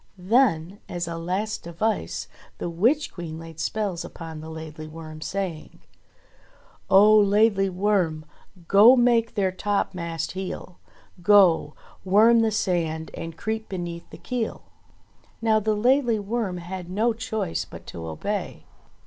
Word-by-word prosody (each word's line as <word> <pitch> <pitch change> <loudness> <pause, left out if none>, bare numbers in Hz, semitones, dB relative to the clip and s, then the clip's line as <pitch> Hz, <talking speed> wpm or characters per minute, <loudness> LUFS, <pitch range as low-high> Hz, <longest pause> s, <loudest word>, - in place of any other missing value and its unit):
Then, 195 -3 +2
as 175 -1 -3
a 170 - -4
last 185 +6 -2
device, 170 - -2 0.3
the 175 - -4
Witch 245 - +1
Queen 165 -3 -6
laid 165 -1 -10
spells 200 -4 -2
upon 160 -2 -8
the 160 - -8
Laidly 160 -1 -8
Worm, 155 0 -10
saying: 185 -3 -5 1.1
"Oh! 210 +3 +7
Laidly 200 -1 +3
Worm! 180 -5 0 0.4
Go 215 +6 +8
make 240 -2 +2
their 195 -3 +1
topmast 180 -4 -2
heel, 185 -1 -6 0.4
Go! 180 -6 +5 0.3
Worm 215 +5 +5
the 225 -1 +3
sand, 170 -6 -1
and 165 -1 -7
creep 220 +2 -3
beneath 175 -3 -6
the - - -11
keel." 245 -3 -4 0.8
Now 220 -1 +3
the 215 0 0
Laidly 245 +1 +3
Worm 205 -2 -2
had 175 0 -7
no 220 +5 +1
choice 220 - -3
but - - -12
to 85 - -8
obey. 80 -1 -4
190 Hz, 130 wpm, -25 LUFS, 165-215 Hz, 1.1 s, Go